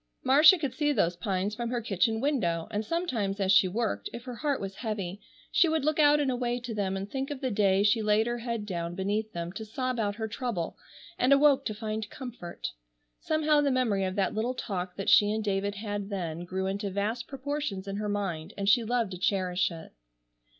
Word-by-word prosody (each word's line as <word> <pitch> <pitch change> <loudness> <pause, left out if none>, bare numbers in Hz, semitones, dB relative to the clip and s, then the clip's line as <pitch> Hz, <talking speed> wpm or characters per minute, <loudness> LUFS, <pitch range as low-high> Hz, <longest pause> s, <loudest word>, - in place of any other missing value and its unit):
Marcia 295 +7 +7
could 285 -6 -3
see 295 -1 +1
those 175 -11 +1
pines 190 +2 -1
from 235 +1 -3
her 245 0 -1
kitchen 220 0 +1
window, 190 - 0
and 210 0 -1
sometimes 225 - -1
as 190 -1 +2
she 190 -1 +6
worked, 180 - -2
if 235 - -8
her 250 -1 -6
heart 290 -1 0
was 195 -1 -5
heavy, 205 -4 -4 0.3
she 345 - +4
would 315 -3 0
look 310 0 +1
out 295 0 +6
and 280 -3 +1
away 245 -1 -1
to 240 -1 -6
them, 195 -2 -1
and 195 +1 -6
think 270 0 -2
of 290 -2 -5
the 260 -2 -2
day 200 -1 +3
she 215 +2 +3
laid 210 +1 +3
her 240 0 -2
head 230 -2 -3
down 170 -3 -4
beneath 210 +3 -1
them 170 -1 -4
to 205 +4 -6
sob 255 +3 -3
out 205 -2 0
her 220 0 -3
trouble, 215 -6 -3 0.4
and 255 - +3
awoke 280 -1 +5
to 215 - -2
find 215 -1 -4
comfort. 245 -10 -7 0.5
Somehow 310 -1 +2
the 285 - +2
memory 240 -7 +1
of 185 0 -2
that 195 -2 +1
little 235 +4 -1
talk 185 -7 -4
that 195 - -5
she 205 - +6
and 220 0 -1
David 200 0 -1
had 205 -1 -4
then 175 -4 -4
grew 190 +1 -3
into 200 +1 -2
vast 210 +5 -2
proportions 270 -8 -4
in 195 0 -3
her 210 0 -2
mind, 190 -6 -3
and 200 0 -2
she 230 +4 +5
loved 230 -2 0
to 180 - -6
cherish 185 -2 +1
it. 165 -1 -10
215 Hz, 220 wpm, -29 LUFS, 195-250 Hz, 0.5 s, Marcia